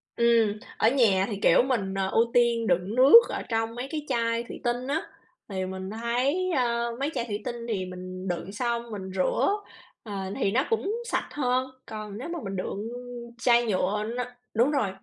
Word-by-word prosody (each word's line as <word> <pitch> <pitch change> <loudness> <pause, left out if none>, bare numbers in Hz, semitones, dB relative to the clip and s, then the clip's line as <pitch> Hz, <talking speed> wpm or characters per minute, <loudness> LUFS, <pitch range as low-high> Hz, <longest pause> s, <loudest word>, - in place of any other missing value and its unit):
Ừm, 230 -3 +3 0.2
ở 220 - +4
nhà 220 -8 +3
thì, 205 -3 -4
kiểu, - - +6
mình, 225 -8 -1
ờ, 195 -1 -1
ưu 230 +1 +2
tiên 235 -2 +3
đựng 180 +4 +1
nước 265 - +10
ở - - -3
trong 225 0 -1
mấy 250 +2 -4
cái 305 -2 -3
chai 230 -2 0
thủy 240 - -9
tinh 245 +2 -1
á 310 +4 0 0.5
thì 190 -2 -2
mình 190 0 -5
thấy, 250 - 0
ơ, 235 -2 0
mấy 280 +2 0
chai 235 - -2
thủy 210 -2 -4
tinh 240 -2 -4
thì 200 -5 -1
mình 185 +1 -7
đựng 175 +1 -3
xong 235 +1 -2
mình 190 -3 -6
rửa, 185 - +2 0.5
ờ, 210 - -7 0.3
thì 195 - +2
nó 255 +6 +2
cũng 440 -2 0
sạch - - -1
hơn, 255 -2 0 0.2
còn 215 -2 -7
nếu 255 - -6
mà 340 0 -3
mình 195 -1 -4
đựng 200 +3 -4 0.5
chai 240 0 +4
nhựa 205 0 0
nó 250 - -1 0.3
đúng 240 +6 +3
rồi, 270 -9 +1
230 Hz, 195 wpm, -27 LUFS, 200-250 Hz, 0.5 s, nước